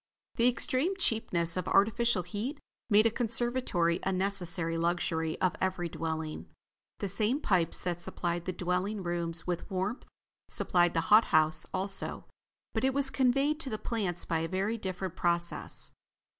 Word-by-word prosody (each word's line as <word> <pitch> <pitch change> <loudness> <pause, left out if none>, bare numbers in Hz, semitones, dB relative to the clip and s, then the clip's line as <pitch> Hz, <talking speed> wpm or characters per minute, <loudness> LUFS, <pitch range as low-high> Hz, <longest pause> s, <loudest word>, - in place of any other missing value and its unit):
The 235 - +4
extreme 265 +8 +2
cheapness 175 - +2
of 185 -1 -3
artificial 220 0 +3
heat 210 - -4 0.3
made 215 +1 +5
a 230 - +4
conservatory 230 -7 +1
a 190 - -1
necessary 180 -3 -1
luxury 165 -1 -1
of 185 - +1
every 185 -2 -1
dwelling. 160 -1 -4 0.5
The 200 - -3
same 215 +8 0
pipes 180 - +1
that 175 -1 -2
supplied 175 0 -3
the 185 - -1
dwelling 185 +3 -2
rooms 170 -1 -3
with 175 +1 -3
warmth, 195 +5 -3 0.4
supplied 175 -1 +1
the 165 - +3
hot 220 +2 +8
house 155 0 +2
also, 195 +1 -2 0.5
but - - -1
it 265 0 +2
was 275 -1 +4
conveyed 275 +4 +2
to 290 - -3
the 215 - -3
plants 195 -7 -2
by 165 -2 0
a 165 - -2
very 195 +5 -1
different 190 -4 -4
process. 170 -1 -1
185 Hz, 155 wpm, -30 LUFS, 170-225 Hz, 0.5 s, hot